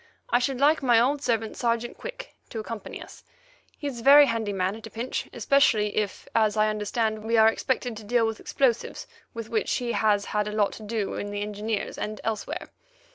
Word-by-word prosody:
I - - +5
should 255 0 -1
like 300 +3 +4
my 240 -4 +5
old 275 +4 +2
servant, 225 -4 -1
Sergeant 235 0 -1
Quick, - - -8 0.2
to - - -7
accompany 220 0 -6
us. - - -14 0.5
He's 280 -5 -5
a - - -9
very 285 +2 +9
handy 230 -4 -1
man 190 0 -1
at 220 - -9
a - - -11
pinch, 235 +3 -4
especially 220 -7 +2
if, 210 -2 -2
as 215 -1 +2
I 215 0 +4
understand, 215 +1 -1
we 230 +1 +1
are 220 0 +7
expected 245 0 -2
to 220 - -9
deal 230 +2 +2
with 225 -1 -3
explosives 245 -4 0 0.3
with 230 -1 -6
which 220 -2 0
he 245 -2 -1
has 210 -3 +2
had 210 0 -1
a - - -3
lot 210 -2 +2
to - - -10
do 215 -1 -2
in 205 - -4
the 205 0 -3
Engineers 210 +1 -3
and 215 -1 -4
elsewhere. 220 -2 -3
225 Hz, 205 wpm, -26 LUFS, 210-245 Hz, 0.5 s, very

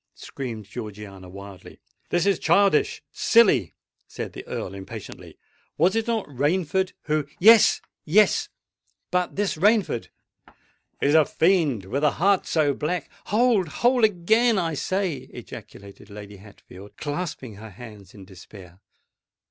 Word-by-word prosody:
screamed 115 -6 -7
Georgiana 100 -4 -9
wildly. 100 0 -12 0.3
"This 175 0 +1
is 200 -1 +2
childish—silly!" 200 - +2 0.3
said - - -7
the - - -8
Earl 95 - -5
impatiently. 95 -1 -10 0.4
"Was 175 +7 +3
it 225 +1 -1
not 225 -3 -1
Rainford 160 +7 -1
who——" 150 -2 -1
"Yes—yes: 210 -2 +4 0.6
but 180 0 -1
this 205 -4 -1
Rainford——" 200 - +2 0.9
"Is 145 - +2
a 160 -1 +6
fiend, 155 - +1
with 135 +9 -3
a 150 - +3
heart 195 +2 +2
so 150 -3 +2
black——" 155 +4 -3
"Hold! 220 -4 +2
hold! 245 - +1
again 220 +4 +3
I 165 -3 -1
say," 185 0 -2
ejaculated 100 +1 -12
Lady 100 0 -10
Hatfield, 100 0 -15
clasping 145 - -5
her 110 +1 -10
hands 105 -2 -13
in 100 -2 -12
despair. 90 -1 -14
150 Hz, 125 wpm, -24 LUFS, -, 0.9 s, a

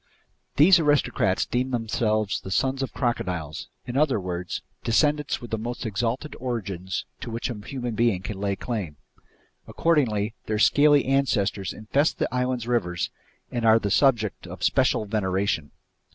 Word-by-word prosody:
These 175 +5 +7
aristocrats 140 - +2
deem 125 +2 -1
themselves 110 -3 0
the - - -8
sons 130 +7 0
of 135 - -2
crocodiles, 90 - -2 0.2
in 120 0 -6
other 140 -6 +3
words, 90 -1 -4 0.2
descendants 150 +5 +2
with 120 - -9
the 110 - -1
most 120 +3 -5
exalted 115 +7 -2
origins 100 -7 -3
to - - -6
which 115 +2 -3
a 105 -3 -8
human 125 -3 -4
being 110 -5 +1
can 100 -2 -5
lay 100 -1 0
claim. 95 - -4 0.7
Accordingly, 115 -10 +1
their 110 - 0
scaly 145 +5 +5
ancestors 125 -8 +1
infest 140 +8 0
the - - 0
island's 125 -2 -1
rivers 90 -8 -1 0.4
and 120 -1 -2
are 110 0 +6
the 105 -3 -2
subjects 110 -6 +2
of 90 0 -8
special 130 +1 +2
veneration. 95 -6 -1
115 Hz, 150 wpm, -25 LUFS, 100-130 Hz, 0.7 s, These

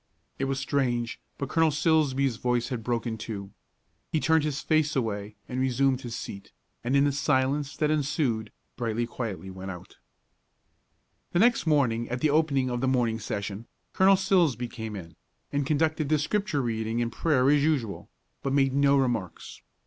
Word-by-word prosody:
It 135 - 0
was 135 0 -1
strange, 125 -4 -1 0.2
but 140 - -3
Colonel 160 +3 +3
Silsbee's 140 -5 +2
voice 125 -1 0
had 125 -4 -3
broken, 115 -1 -2
too. 100 -3 -6 0.6
He 160 - +1
turned 160 +2 +3
his 150 -2 -1
face 155 -1 +1
away 105 -4 -2
and 125 - -3
resumed 130 0 +2
his 120 -2 -5
seat, 100 - -7 0.3
and, 125 +3 0
in 140 - +5
the 145 - +2
silence 140 0 0
that 150 -1 +1
ensued, 140 -7 0 0.3
Brightly 115 -1 -1
went 115 - -6
quietly 100 -5 -5
out. 95 -2 -8 1.4
The - - +2
next 230 -2 +3
morning 125 -7 +2
at 125 - -2
the 155 +1 +2
opening 140 -4 +2
of 120 0 -2
the 130 - +1
morning 120 -3 +1
session, 105 0 -4 0.3
Colonel 190 +1 +6
Silsbee 175 -10 +2
came 110 -3 -6
in, 85 -4 -9 0.4
and 140 -1 0
conducted 155 0 +1
the 155 - +4
Scripture 150 -2 0
reading 115 0 -1
and 120 -1 -1
prayer 135 -1 +2
as 145 -1 +4
usual, 135 -10 -1 0.3
but 135 - -1
made 135 -1 +3
no 140 0 +4
remarks. 120 -11 -2
130 Hz, 170 wpm, -27 LUFS, 115-150 Hz, 1.4 s, Colonel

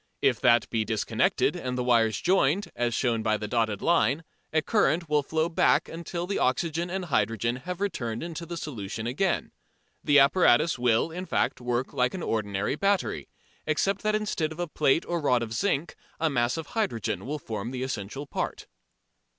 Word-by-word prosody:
If - - +2
that 120 -1 +4
be 115 -1 +1
disconnected, 110 -1 +1
and 125 0 -3
the 125 - 0
wires 115 -4 +3
joined, 185 +1 +2
as 120 -1 0
shown 115 -3 +1
by 110 -1 +1
the 105 - -5
dotted 110 -2 0
line, 160 -2 +2 0.3
a 155 -1 +1
current 175 -5 +2
will 150 -1 +2
flow 160 +3 0
back 160 -1 +2
until 170 +1 -5
the 195 +2 -2
oxygen 165 +6 0
and 185 0 -3
hydrogen 115 - 0
have 180 +7 -6
returned 120 - -2
into 170 0 -6
the 170 - -5
solution 115 -7 -5
again. 160 +11 0 0.5
The 145 - +4
apparatus 145 -1 +4
will, 120 +5 +2
in 180 +3 -6
fact, - - 0
work 120 +1 -2
like 125 +3 +1
an 180 - -5
ordinary 105 +2 -1
battery, 195 +3 0 0.4
except 190 +6 +1
that 215 0 +1
instead 205 -7 -1
of 160 - -9
a 175 - 0
plate 150 +1 +2
or 170 -1 -2
rod 125 -5 +2
of 115 -1 -5
zinc 170 - -1 0.2
a 160 -1 +1
mass 120 +1 +1
of 160 - -4
hydrogen 115 - -2
will 150 +2 -2
form 110 -5 -5
the 130 0 -4
essential 130 +2 -4
part. - - -4
140 Hz, 185 wpm, -27 LUFS, 115-170 Hz, 0.5 s, that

